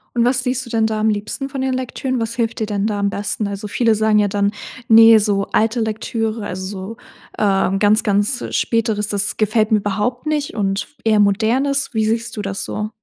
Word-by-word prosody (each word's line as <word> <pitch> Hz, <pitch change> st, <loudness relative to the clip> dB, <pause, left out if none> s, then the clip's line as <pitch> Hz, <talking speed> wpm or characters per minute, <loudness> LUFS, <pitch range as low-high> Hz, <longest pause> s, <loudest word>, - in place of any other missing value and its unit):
Und 235 Hz, 0 st, +2 dB
was 250 Hz, 0 st, +1 dB
liest 250 Hz, 0 st, -1 dB
du -, -, -11 dB
denn 225 Hz, -2 st, +1 dB
da 220 Hz, -1 st, -2 dB
am 220 Hz, +1 st, +2 dB
liebsten 215 Hz, +6 st, -3 dB
von 270 Hz, -1 st, -4 dB
den 265 Hz, 0 st, 0 dB
Lektüren? 255 Hz, 0 st, -3 dB
Was 225 Hz, 0 st, -3 dB
hilft 230 Hz, 0 st, -2 dB
dir 220 Hz, -, 0 dB
denn 205 Hz, -1 st, -1 dB
da 210 Hz, -2 st, -2 dB
am 200 Hz, 0 st, +1 dB
besten? 205 Hz, +1 st, -2 dB
Also 200 Hz, +1 st, -5 dB
viele 225 Hz, +1 st, +1 dB
sagen 215 Hz, 0 st, +2 dB
ja 205 Hz, -, +2 dB
dann: 200 Hz, 0 st, 0 dB, 0.4 s
„Ne, 225 Hz, 0 st, +8 dB
so 200 Hz, -2 st, 0 dB
alte 225 Hz, +2 st, +1 dB
Lektüre, 220 Hz, 0 st, -3 dB
also 185 Hz, 0 st, -5 dB
so, 195 Hz, +3 st, -7 dB, 0.4 s
ähm, 195 Hz, -1 st, +1 dB
ganz, 210 Hz, +1 st, +3 dB
ganz 205 Hz, +4 st, +1 dB
Späteres, 220 Hz, -3 st, 0 dB
das 205 Hz, 0 st, -1 dB
gefällt 215 Hz, +1 st, +1 dB
mir 215 Hz, -, +5 dB
überhaupt 210 Hz, +6 st, -2 dB
nicht 300 Hz, -2 st, -2 dB
und 195 Hz, -2 st, -1 dB, 0.2 s
eher 220 Hz, -2 st, +3 dB
Modernes.“ 235 Hz, +8 st, +2 dB
Wie 220 Hz, -1 st, +1 dB
siehst 230 Hz, +2 st, -2 dB
du -, -, -2 dB
das 195 Hz, -1 st, -4 dB
so? 215 Hz, 0 st, -4 dB
215 Hz, 210 wpm, -19 LUFS, 205-235 Hz, 0.4 s, Ne